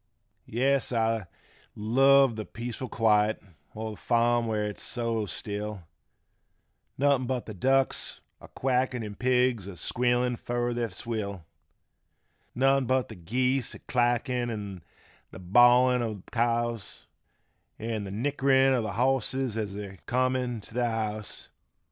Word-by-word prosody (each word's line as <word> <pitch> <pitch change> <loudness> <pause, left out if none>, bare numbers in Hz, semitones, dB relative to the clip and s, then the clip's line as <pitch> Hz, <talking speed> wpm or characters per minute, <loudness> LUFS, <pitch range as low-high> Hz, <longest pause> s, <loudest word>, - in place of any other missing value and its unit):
57 115 - -8
Yes 140 -2 +2
I 115 -4 0 0.5
love 135 +3 +4
th' 110 -1 -7
peaceful 120 +2 -5
quiet 110 -1 +2 0.4
olth' 110 -1 -5
farm 120 0 +2
where 110 -1 0
it's 105 -1 -5
so 115 -3 -2
still, 105 +3 -5 1.1
Nothin' 140 -2 +2
but 130 -1 -2
th' 105 -5 -9
ducks 135 +3 +1 0.2
a - - -12
quackin' 125 -2 -1
'n' 105 -1 -6
pigs 125 -3 +1
a 100 - -8
squealin' 120 +4 +1
fur 120 +1 -2
their 120 -1 -1
swill, 100 -3 -5 1.1
Nothin' 135 0 +3
but 130 -1 +1
th' 85 - -12
geese 125 +4 +1
a - - -11
clackin' 120 0 +1
'n' 100 -5 -5 0.5
the - - -11
bawlin* 120 +6 +5
o' 110 -2 -2
th' 95 - -15
cows, 120 -2 -1 0.7
An' 110 -1 -3
th' 95 - -6
nickerin' 135 +3 +3
o' 125 - +2
th' 105 -4 -4
bosses 130 -1 +1
as 105 -3 -3
they're 100 -2 -7
comin' 125 -2 0
t' 105 - -13
th' - - +2
house. 110 -2 -3
120 Hz, 135 wpm, -28 LUFS, 105-125 Hz, 1.1 s, bawlin